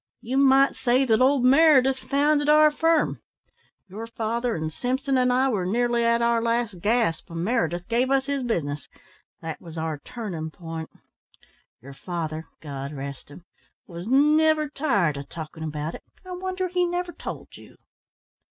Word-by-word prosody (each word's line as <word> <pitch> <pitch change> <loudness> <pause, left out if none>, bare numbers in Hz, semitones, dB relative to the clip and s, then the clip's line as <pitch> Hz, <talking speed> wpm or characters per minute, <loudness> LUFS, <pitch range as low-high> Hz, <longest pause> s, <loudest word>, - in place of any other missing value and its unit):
You 255 +2 -4
might 275 0 +5
say 255 +1 +2
that 225 -1 +2
old 265 -1 +3
Meredith 270 -2 +5
founded 290 +2 +1
our 305 0 +6
firm. 325 +1 +1 0.7
Your 215 +5 -7
father 230 +1 -2
and 160 -1 -4
Simpson 265 - -1
and 250 -1 +3
I 260 +2 +3
were 205 -7 -1
nearly 240 +3 +1
at 235 0 +2
our 235 0 +2
last 230 -4 -1
gasp 215 -3 0
when 165 0 -4
Meredith 175 -6 -1
gave 240 +3 +1
us 270 -1 +2
his 280 -1 -2
business. 150 - -3 0.6
That 160 -1 -6
was 165 -1 -10
our 160 -2 -3
turning 175 - -6
point. 165 -1 -7 0.9
Your 140 +1 -10
father 160 0 -5
God 140 -2 -6
rest 140 -1 -7
him 160 +4 -14 0.4
was 170 +2 -8
never 305 +3 +3
tired 205 - 0
of 140 - -8
talking 160 -1 -8
about 155 +1 -4
it. - - -9 0.2
I 370 - -9
wonder 370 +1 -3
he 360 0 0
never 350 0 -2
told - - -8
you." - - -15
235 Hz, 160 wpm, -25 LUFS, 165-275 Hz, 0.9 s, our